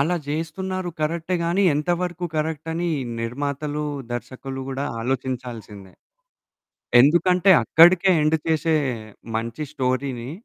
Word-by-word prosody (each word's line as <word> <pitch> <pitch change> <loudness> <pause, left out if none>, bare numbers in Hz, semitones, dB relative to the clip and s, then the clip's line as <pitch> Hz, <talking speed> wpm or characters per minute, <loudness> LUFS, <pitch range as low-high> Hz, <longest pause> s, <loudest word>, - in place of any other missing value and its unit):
అలా 170 +5 +1
జేస్తున్నారు 175 +5 -3
కరెక్టే 165 +3 -1
గానీ 170 +4 +1
ఎంతవరకు 175 +3 -1
కరెక్ట్ 155 0 -2
అని 170 +1 -1 0.3
నిర్మాతలు, 145 +5 -3 0.3
దర్శకులు 135 +2 -6
కూడా 135 +1 -3 0.2
ఆలోచించాల్సిందే. 120 -6 -5 1.1
ఎందుకంటే, 180 +7 +4
అక్కడికే 175 +3 +6
ఎండ్ 155 +1 +3
చేసే 160 0 +2 0.6
మంచి 115 +5 -4
స్టోరీని 130 -2 -2
150 Hz, 100 wpm, -23 LUFS, 130-170 Hz, 1.1 s, అక్కడికే